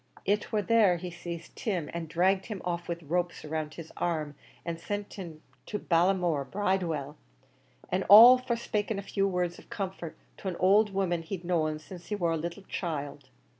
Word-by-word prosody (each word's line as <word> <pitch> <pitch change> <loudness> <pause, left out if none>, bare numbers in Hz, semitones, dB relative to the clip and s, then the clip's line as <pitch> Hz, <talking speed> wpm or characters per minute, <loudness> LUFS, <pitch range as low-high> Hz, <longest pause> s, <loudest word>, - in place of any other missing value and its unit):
It 205 +2 0
war 210 -2 +1
there 210 -4 +4
he 180 +1 -6
sazed 170 -1 -7
Tim, 180 -9 -2
an' 170 -1 -4
dragged 185 +4 +1
him 210 -4 -5
off 175 -1 -3
with 170 -1 -4
ropes 175 +2 -2
round 155 0 -4
his 165 -2 -9
arms, 155 -4 -2 0.3
an' 170 -1 -4
sent 205 +4 -4
him 165 -5 -9 0.2
to 210 - -2
Ballinamore 175 -4 +2
Bridewell, 170 -8 -1 0.7
an' 185 +1 +1
all 235 +5 +11
for 250 -2 -1
'spaking 215 -2 -2
a 200 - -4
few 195 0 0
words 180 -2 -1
of - - -18
comfort 190 -5 -5 0.2
to - - -7
an 180 - -3
owld 205 +3 +4
woman 185 -3 0
he'd 175 +1 -6
known 155 -3 0
since 175 +3 -11
he 210 - -2
war 175 -4 0
a - - +1
little 170 +5 -5
child. 145 -7 -5
175 Hz, 185 wpm, -29 LUFS, 165-195 Hz, 0.7 s, all